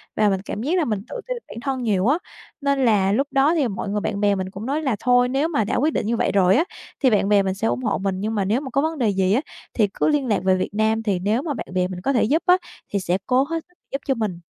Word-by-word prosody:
Và 215 -1 +3
mình 190 -1 0
cảm 210 - -4
giác 325 +8 +1
là 340 - +2
mình 215 -5 -1
tự - - -5
ti - - -1
bản - - -10
thân 265 -2 -2
nhiều 205 -3 +1
á, 285 +5 +4 0.4
nên 280 -2 +1
là 200 -4 +3
lúc 275 +7 +1
đó 275 +4 +3
thì 290 -6 +2
mọi 200 -1 -4
người, 210 +1 -1
bạn 200 - -2
bè 205 -1 +3
mình 190 -1 -3
cũng 195 +3 -8
nói 285 +5 -1
là 265 -7 0
thôi 245 0 +3
nếu 275 +4 +1
mà 295 -10 0
đã 210 - -2
quyết 300 +5 +1
định - - -1
như 230 +2 0
vậy - - +1
rồi 190 -1 +4
á 315 - +4 0.4
thì 260 - +6
bạn 205 -3 +2
bè 205 -1 +4
mình 190 -1 -1
sẽ 200 +4 -2
ủng 255 - -1
hộ 215 -4 0
mình. 190 -1 -2
Nhưng 215 +3 -2
mà 200 -2 0
nếu 220 +7 +1
mà 275 - -6
có 275 - +1
vấn 320 +1 -1
đề 240 -6 +2
gì 190 -1 +1
á 250 - +2 0.3
thì 215 -3 +3
cứ - - 0
liên 295 -4 +1
lạc 215 - +2
về 190 0 +3
Việt 185 - -3
Nam 220 +1 +1
thì 200 -4 0
nếu 210 +7 0
mà 300 -1 -3
bạn 250 - -6
bè 180 -1 +1
mình 180 -1 -7
có 275 +9 0
thể 240 - +3
giúp 305 +9 +1
á, 360 0 +6 0.4
thì 200 - +2
sẽ 180 -1 0
cố 255 +1 +3
hết 325 +3 -3
sức 360 - -32
giúp 275 - -3
cho 270 - +3
mình. 210 -7 -3
225 Hz, 320 wpm, -22 LUFS, 200-275 Hz, 0.4 s, thì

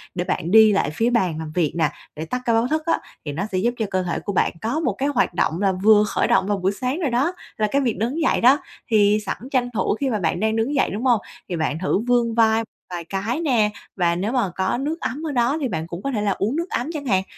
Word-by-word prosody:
để 175 - -1
bạn 175 -1 -2
đi 220 0 +7
lại 195 -8 +1
phía 225 +9 +1
bàn 185 -10 +1
làm 160 -1 -6
việc 170 -4 +1
nè, 160 -3 +2 0.3
để 155 +1 -5
tắt 250 +10 -3
cái 235 - +2
báo 230 +2 +2
thức 310 +2 -1
á, 335 - +1 0.3
thì 145 - -3
nó 170 +7 -2
sẽ 185 - -1
giúp 235 +6 +1
cho 220 - -1
cơ 185 -1 0
thể 175 -1 -2
của 200 - -4
bạn - - +2
có 235 +8 -1
một 325 - 0
cái 275 +2 0
hoạt 250 -9 +1
động 170 0 0
là 195 -1 +3
vừa 210 +3 +5
khởi - - 0
động 195 0 +2
vào 205 -1 +1
buổi 190 0 0
sáng 255 - -3
rồi 315 -6 0
đó, 270 +9 +1 0.2
là 215 - +1
cái 280 - +2
việc 240 -5 0
đứng 250 +9 -1
dậy 320 - +2
đó. 255 +4 +6 0.3
Thì 210 -2 +4
sẵn - - -3
tranh 245 -2 +1
thủ 200 -1 0
khi 275 - 0
mà 215 -4 -1
bạn 170 -1 0
đang 220 +2 +1
đứng 230 +6 0
dậy 275 - +2
đúng 210 +5 -4
hông, 240 -5 +3 0.3
thì 180 - -2
bạn 160 -1 -1
thử 185 +1 +1
vươn 240 -2 +2
vai 225 -1 +3 0.3
vài 175 -2 -5
cái 200 - -2
nè, 245 -10 +2 0.3
và 170 -3 +1
nếu 195 +6 -2
mà 245 -7 +1
có 190 +4 0
nước 300 +6 -3
ấm 290 +5 -3
ở - - -2
đó 250 +2 +1
thì 270 - 0
bạn 160 -7 -4
cũng 170 +1 -7
có 275 - -2
thể 220 -5 -1
là 205 -1 +1
uống 210 +7 -1
nước 340 +3 -2
ấm 245 +6 -2
chẳng 295 -3 -5
hạn. 190 -6 +2
220 Hz, 285 wpm, -22 LUFS, 185-255 Hz, 0.3 s, đi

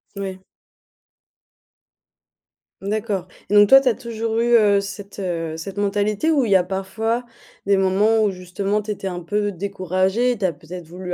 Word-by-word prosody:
Oui. 190 -1 -5 2.4
D'accord, 205 -2 -2 0.2
et - - +1
donc 205 0 +7
toi 270 - +10
tu 270 -1 +2
as - - +2
toujours 230 -2 -3
eu, 240 +1 +3
heu, 205 -3 +4
cette, 200 0 -8
heu, 165 -4 -3
cette 190 +5 -7
mentalité 205 +8 0
où 280 -5 +2
il 215 - -2
y - - +6
a 185 - +5
parfois 220 +6 -2 0.4
des 200 -1 +4
moments 205 +4 +3
où 205 - +2
justement 195 +3 -2
tu 215 - -11
étais 205 -2 -4
un 180 -2 -3
peu 205 +4 -1
découragé, 190 +5 0
tu 205 -4 -2
as 180 - +2
peut-être 165 +3 -10
voulu 180 +1 -6
200 Hz, 175 wpm, -21 LUFS, 185-215 Hz, 2.4 s, toi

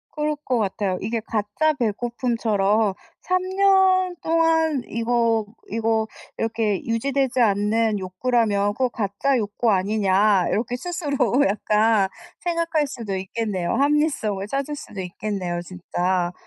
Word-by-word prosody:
그럴 300 0 0
것 250 -2 +1
같아요. 195 -2 -1
이게 225 +3 -1
가짜 220 +9 0
배고픔처럼 225 -4 0 0.3
'3 365 0 +1
년 380 -2 +3
동안 325 -3 +2
이거 230 -1 +1 0.2
이거 225 0 0 0.3
이렇게 220 -3 -1
유지되지 260 +2 0
않는 210 0 +2
욕구라면 205 +1 0
그거 255 +2 0
가짜 230 +5 0
욕구 215 +1 0
아니냐.' 195 -1 +2
이렇게 235 +3 -1
스스로 285 -4 0
약간 210 0 +2 0.3
생각할 335 -3 0
수도 220 -8 -5
있겠네요. 190 -2 -2
합리성을 275 -9 +1
찾을 275 +5 -2
수도 210 -8 -7
있겠네요 180 -1 -4
진짜. 180 0 -2
225 Hz, 275 characters per minute, -23 LUFS, 200-275 Hz, 0.3 s, 년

